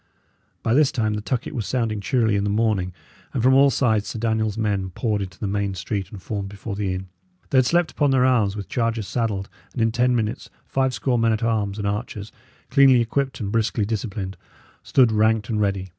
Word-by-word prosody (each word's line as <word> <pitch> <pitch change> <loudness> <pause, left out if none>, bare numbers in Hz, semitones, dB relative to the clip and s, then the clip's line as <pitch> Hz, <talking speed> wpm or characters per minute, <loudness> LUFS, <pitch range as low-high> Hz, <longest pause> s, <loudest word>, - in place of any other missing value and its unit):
By 115 - +1
this 145 +1 +4
time 110 -3 0
the 105 - -3
tucket 125 +6 -3
was 115 -7 -3
sounding 115 -5 -1
cheerily 115 -2 +1
in 100 - +1
the 105 - 0
morning, 105 -4 +1 0.4
and 120 - 0
from 130 +1 +5
all 140 +1 +6
sides 110 -6 +1
Sir - - -5
Daniel's 110 -1 0
men 100 -4 -1
poured 105 +3 -1
into 95 -1 -6
the - - -4
main 100 -1 -1
street 95 0 -3
and 100 - -9
formed 100 +1 -4
before 100 +1 -6
the 100 -2 -1
inn. 95 +1 -4 0.4
They 130 - +5
had 125 - +3
slept 175 +1 +2
upon 145 -2 +1
their 130 -1 +3
arms, 110 -6 +2
with 100 -2 -6
chargers 115 -3 -1
saddled, 105 -5 -1 0.3
and - - -5
in 115 0 +2
ten 125 +2 +2
minutes 115 +1 -2 0.2
five 130 -1 0
score 125 -3 0
men 115 0 +3
at 110 +2 -2
arms 105 -3 0
and 105 - -3
archers, 105 0 -3 0.4
cleanly 135 -3 +6
equipped 130 +3 -1
and 100 -1 -3
briskly 110 -1 +1
disciplined, 100 -3 -4 0.4
stood 125 -4 +3
ranked 110 0 +2
and 110 -2 0
ready. 100 -2 -1
110 Hz, 215 wpm, -23 LUFS, 100-120 Hz, 0.4 s, all